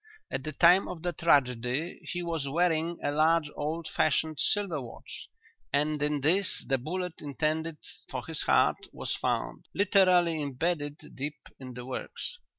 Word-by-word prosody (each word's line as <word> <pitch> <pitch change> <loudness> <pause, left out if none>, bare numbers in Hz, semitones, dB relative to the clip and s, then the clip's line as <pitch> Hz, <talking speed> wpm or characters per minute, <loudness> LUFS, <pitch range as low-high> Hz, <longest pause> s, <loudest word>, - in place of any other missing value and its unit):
At 135 - -3
the 155 - -4
time 175 +5 +5
of 175 -2 -7
the 175 - 0
tragedy 130 -1 +1
he 175 0 -3
was 165 -5 -2
wearing 165 +1 +1
a 145 - +1
large 155 0 +3
old 155 +2 -3
fashioned 155 0 +1
silver 195 -8 +1
watch; 120 -2 -10 0.4
and 150 +1 +1
in 150 -1 +1
this 180 +7 +3
the 135 -1 +1
bullet 180 +5 -4
intended 155 +2 -2 0.3
for - - -5
his - - 0
heart - - +2
was - - -3
found, - - -2
literally 180 -5 +4
embedded 145 +1 -3
deep 145 +3 -4 0.2
in 130 -2 -9
the 125 0 -7
works. 130 - -5
155 Hz, 155 wpm, -29 LUFS, 145-170 Hz, 0.4 s, time